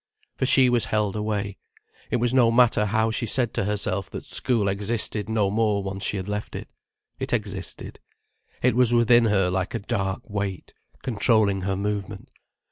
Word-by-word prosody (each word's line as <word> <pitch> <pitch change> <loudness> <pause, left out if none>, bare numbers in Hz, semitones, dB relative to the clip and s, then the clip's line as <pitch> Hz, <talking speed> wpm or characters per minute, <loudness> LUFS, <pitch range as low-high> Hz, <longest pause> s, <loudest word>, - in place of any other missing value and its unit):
For 130 - -1
she 130 -1 +6
was 120 -2 +3
held 105 -2 -1
away. 105 -2 -2 0.5
It - - 0
was 120 +1 +1
no 125 -3 +5
matter 115 -3 +3
how 110 +2 +1
she 115 0 -2
said 120 +1 +1
to - - -1
herself 100 -2 -2
that - - -7
school 115 -6 +1
existed 105 +1 -1
no 105 -3 +1
more 105 -2 +1
once 95 0 -5
she 100 - 0
had 95 0 -5
left 105 0 -4
it. - - -6 0.5
It - - -3
existed. - - -4 0.6
It - - +3
was 120 -1 +4
within 120 0 +5
her 95 -4 +2
like 95 0 -2
a - - -1
dark 100 0 -3
weight, 100 -3 -4 0.3
controlling 110 -4 +2
her 95 +1 -1
movement. 100 0 -4
105 Hz, 175 wpm, -24 LUFS, 100-115 Hz, 0.6 s, she